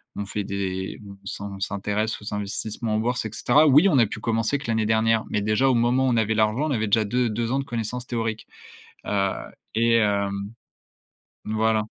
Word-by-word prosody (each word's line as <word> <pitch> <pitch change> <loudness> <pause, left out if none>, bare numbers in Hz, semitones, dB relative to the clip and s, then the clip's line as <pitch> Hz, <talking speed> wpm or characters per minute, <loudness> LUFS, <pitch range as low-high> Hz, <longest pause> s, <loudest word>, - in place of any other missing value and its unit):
on 100 - -3
fait 105 0 -3
des 95 -1 -4
on 100 0 -13
s'in 100 +1 -5
on - - -10
s'intéresse 105 +2 -2
aux 105 - -6
investissements 110 +2 -3
en - - +1
bourse 120 0 -1
et 110 - -4
cetera. 150 +6 +4
Oui, 150 +8 +6
a 135 - +4
pu 105 - -6
commencer 115 +5 0
que 145 - -10
l'année 110 -1 +1
dernière, 110 0 +2
mais 105 - 0
déjà 105 +6 +2
au 130 - +4
moment 120 +3 +2
où - - +3
on 120 - +2
avait 110 0 +1
l'argent, 110 +8 +2
on - - -2
avait 110 -4 0
déjà 110 +1 +3
deux 125 +3 +1
deux 115 +2 -2
ans 135 - +1
de - - -1
connaissances 120 -1 -4
théoriques. 115 -3 -3 0.6
Heu 100 -1 +1 0.4
et 115 0 +3
hem 100 -1 0 0.9
voilà. 110 0 +1
110 Hz, 205 wpm, -24 LUFS, 105-120 Hz, 0.9 s, Oui